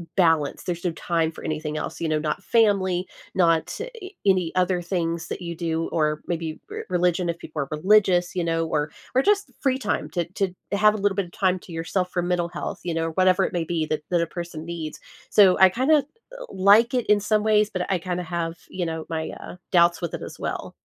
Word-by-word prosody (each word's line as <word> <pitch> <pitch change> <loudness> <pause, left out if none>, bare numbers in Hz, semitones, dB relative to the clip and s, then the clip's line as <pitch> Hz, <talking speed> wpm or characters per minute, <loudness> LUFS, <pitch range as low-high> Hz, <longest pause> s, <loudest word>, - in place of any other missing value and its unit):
balance, 165 -6 +2
there's 175 0 -4
no 175 - +2
time 165 -1 -1
for - - -12
anything 155 -1 -3
else, - - -4
you 165 - -1
know, 155 -1 +1
not 150 0 -2
family, 195 -5 +2 0.3
not, 165 -3 +2
eh, 460 -5 -7 0.2
any 185 -4 +3
other 185 0 +2
things 170 -2 -2
that - - -5
you 170 -1 -5
do, 165 -1 -2
or 155 -1 0
maybe 165 -2 -3
r - - -5
religion 180 -1 +1
if 170 0 -3
people 155 -1 -7
are - - -9
religious, 180 +2 +3
you 180 - 0
know, 165 -1 0
or 150 -1 -1 0.2
or 260 - +4
just 410 0 +2
free 265 -1 +1
time 210 - -1
to 175 - 0
to 190 -2 -1 0.2
have 210 +1 +4
a - - -3
little 205 -1 +2
bit 200 -1 0
of 170 - -15
time 185 -1 +1
to 180 - -14
yourself 175 +3 -2
for 175 - 0
mental 175 -1 0
health, - - -5
you 175 - -2
know, 165 0 -1
whatever 185 +1 +4
it - - -2
may 170 - 0
be 160 -1 -2
that 155 -1 -1
that 175 -1 +3
a 170 - 0
person 170 -2 -5
needs. 165 -2 -6 0.3
So, 195 -3 +6
I 190 - +9
kinda 260 - +3
l 280 - -1 0.5
like 205 +6 +5
it 250 -2 0
in 210 0 +5
some 210 +1 +1
ways, 215 -1 +3
but 185 0 -2
I 190 - +3
kinda 180 0 -3
have, 165 0 -3
you 180 -2 -3
know, 160 -1 -4
my, 160 -1 -3
uh, - - -9 0.2
doubts 170 -1 +4
with 170 - -3
it - - -4
as - - -8
well. - - -4
175 Hz, 230 wpm, -24 LUFS, 165-195 Hz, 0.5 s, I